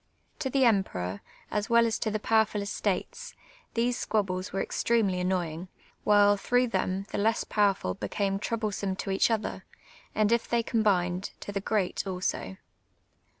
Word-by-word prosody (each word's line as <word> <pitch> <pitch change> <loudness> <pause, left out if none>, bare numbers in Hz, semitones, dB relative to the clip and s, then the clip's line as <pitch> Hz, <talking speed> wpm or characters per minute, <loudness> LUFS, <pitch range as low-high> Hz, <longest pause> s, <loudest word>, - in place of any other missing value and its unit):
To 280 -3 -1
the 265 0 +3
emperor, 100 - 0 0.3
as 210 0 -1
^vell 235 0 +5
as 225 -1 0
to 220 - 0
the 215 - -1
]io\verful 220 -1 +2
I'states, 475 - -3 0.4
these 240 +1 +1
squabbles 185 -4 -1
were 195 - -2
extremely 210 -6 +1
annoyin*^, 180 -2 -1 0.4
while, 205 0 +5
throu{j;h 245 +2 +2
them, 190 -1 -1
the - - -2
less 220 +2 +2
pow 205 -2 +3
erful 90 - -5
became 195 - -1
troublesome 210 -3 -2
to 195 - -4
each 195 - +3
other, 225 -2 -2 0.5
and 215 0 +2
if 235 0 +1
they 235 -1 +2
combined, 190 -5 +1
to - - -6
the 200 -1 -2
«^eat 200 -2 -1
also. 180 - -3
205 Hz, 155 wpm, -28 LUFS, 190-225 Hz, 0.5 s, ^vell